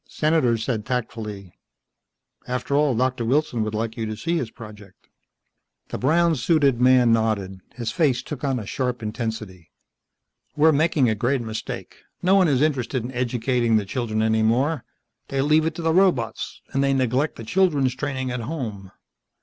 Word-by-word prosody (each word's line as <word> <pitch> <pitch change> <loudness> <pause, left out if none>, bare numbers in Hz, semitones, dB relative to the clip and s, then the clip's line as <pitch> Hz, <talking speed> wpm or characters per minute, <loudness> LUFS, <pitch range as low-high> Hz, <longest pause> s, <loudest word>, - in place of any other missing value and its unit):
Senator 150 -7 +2
said 110 -1 -2
tactfully, 110 -6 -4 0.9
"After 125 +3 -2
all, 145 -3 +3
Doctor 125 0 0
Wilson 125 -1 +1
would 110 0 -3
like 115 +1 -2
you 110 -1 -2
to 110 0 -5
see 170 +8 -1
his 130 -9 -2
project." 105 -5 -13 0.8
The - - -5
brown 165 +5 +3
suited 140 -2 +2
man 125 -2 +5
nodded. 105 -4 0 0.2
His 115 -2 -3
face 140 -5 +1
took 150 -5 -7
on 135 -2 0
a 110 - -5
sharp 125 +1 -3
intensity. 110 -6 -5 0.9
"We're 155 +2 +5
making 155 -3 +2
a 110 - +2
great 120 +4 0
mistake. 110 -1 -6 0.3
No 185 +2 +4
one 195 -3 +5
is 140 -2 +2
interested 130 -4 0
in 125 - -5
educating 125 -1 0
the 105 - -1
children 110 0 -2
any 110 0 +2
more. 130 +6 +1 0.4
They 135 - -3
leave 155 +2 +3
it 165 - -3
to 170 - -6
the 160 0 +2
robots. 180 -10 +1
And 135 0 +1
they 135 0 +2
neglect 130 +3 0
the 115 - -8
children's 145 -2 +2
training 130 -1 -3
at 125 - -3
home." 110 - -5
125 Hz, 170 wpm, -23 LUFS, 110-145 Hz, 0.9 s, man